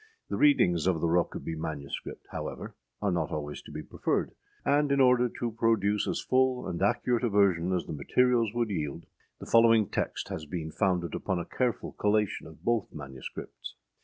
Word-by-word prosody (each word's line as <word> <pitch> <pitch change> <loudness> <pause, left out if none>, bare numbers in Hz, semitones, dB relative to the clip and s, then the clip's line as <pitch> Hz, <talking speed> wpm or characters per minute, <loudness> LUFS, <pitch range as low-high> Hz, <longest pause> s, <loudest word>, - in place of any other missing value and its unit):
â - - -25 0.3
The - - 0
readings 90 - +4
of 90 -3 +2
the 85 - 0
Rokeby 85 -1 0
MS., 75 -3 -4 0.4
however, - - -5 0.3
are 100 - +2
not 90 - -1
always 75 -1 -4
to - - -13
be - - -6
preferred; - - -1 0.3
and 145 0 +3
in 140 - +3
order 125 -2 +5
to 120 -1 -2
produce 110 -2 +1
as - - -1
full 130 -1 +1
and 85 - -4
accurate 120 +4 +1
a 120 - +2
version 95 -4 +3
as 90 -2 0
the - - -5
materials 115 - +2
would 120 -3 0
yield, 80 -2 -3 0.3
the - - -9
following 115 -2 +5
text - - -3
has 80 -1 -5
been 80 0 -4
founded 90 -4 0
upon 95 - -1
a 85 - -3
careful 125 -2 -1
collation 105 -1 0
of 80 -1 -15
both 115 -4 0
MSS. 65 -3 -8
100 Hz, 185 wpm, -29 LUFS, 85-120 Hz, 0.4 s, order